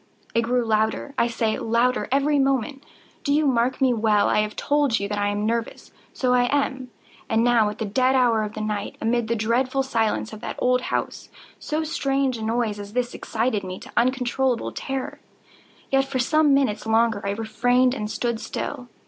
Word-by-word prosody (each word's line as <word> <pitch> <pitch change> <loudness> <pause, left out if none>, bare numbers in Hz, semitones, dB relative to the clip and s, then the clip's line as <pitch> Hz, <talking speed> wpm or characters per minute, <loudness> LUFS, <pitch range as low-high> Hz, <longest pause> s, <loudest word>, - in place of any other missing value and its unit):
It 230 - +3
grew 245 +1 0
louder, 220 +4 0
I 235 - +2
say, 225 -2 -1
louder 235 +3 +1
every 285 +2 +2
moment!—do 270 +1 -3
you 300 +1 +3
mark 250 -1 +1
me 260 -2 +3
well? 215 -2 +2
I - - +2
have 210 0 -1
told 285 -6 +1
you 200 - -2
that 205 0 -3
I 205 - +1
am 205 +1 -1
nervous: 230 +1 -3 0.2
so 250 -1 0
I 245 0 +4
am. 265 -1 -1 0.4
And 225 +1 +2
now 235 -3 +4
at 210 - -7
the 220 - -3
dead 255 +6 +2
hour 240 -4 +3
of 210 0 -4
the 215 - -4
night, 210 -1 -3
amid 230 0 0
the 235 - 0
dreadful 255 +5 0
silence 225 -3 -1
of 215 - -9
that - - -5
old 250 0 +2
house, - - -3 0.3
so 305 +1 -2
strange 275 -5 -1
a - - -7
noise 220 -1 -1
as 205 0 -8
this 245 0 -1
excited 225 -2 -2
me 185 0 -6
to - - -12
uncontrollable 250 0 +1
terror. 270 -1 -5 0.7
Yet, 270 0 +3
for 270 -1 -3
some 300 +4 +3
minutes 265 -6 +1
longer 225 -1 +2
I 200 - -2
refrained 245 +4 +1
and 210 -5 -4
stood 235 0 -2
still. 250 +3 -5
240 Hz, 190 wpm, -23 LUFS, 220-265 Hz, 0.7 s, I